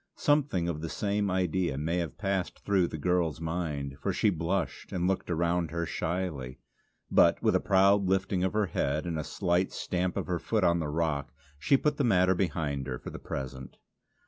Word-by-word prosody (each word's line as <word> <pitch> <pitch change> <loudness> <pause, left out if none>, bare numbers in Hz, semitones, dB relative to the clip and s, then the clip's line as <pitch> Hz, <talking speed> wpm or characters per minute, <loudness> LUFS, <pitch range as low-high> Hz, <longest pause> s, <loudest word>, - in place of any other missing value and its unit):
Something 145 - +2
of 80 -3 -3
the 85 - -4
same 100 +2 -1
idea 90 -4 0
may 80 +4 -1
have 85 -5 -3
passed 95 -3 -2
through 95 -3 +3
the 80 - -6
girl's 85 -1 0
mind, 75 -4 -3
for - - 0
she 105 - +2
blushed 85 +3 -2
and 90 -1 0
looked 95 -1 -1
around 85 0 +1
her 85 +1 -2
shyly; 80 -8 -3 0.5
but, - - +5
with - - +3
a - - +4
proud 100 +1 +4
lifting 95 -1 +1
of 95 - 0
her 105 -1 +2
head 75 -2 -1
and 85 -2 -2
a - - -2
slight 90 +2 0
stamp 90 0 -2
of - - -1
her 90 -2 -1
foot 110 +2 0
on 85 -1 +3
the 80 - -2
rock, 75 -2 -1 0.3
she 135 - +4
put 150 +2 0
the 145 - +1
matter 95 -5 +4
behind 75 -7 -1
her, 65 -1 -3
for - - -8
the - - -7
present. 65 -1 -6
85 Hz, 200 wpm, -29 LUFS, 80-95 Hz, 0.5 s, but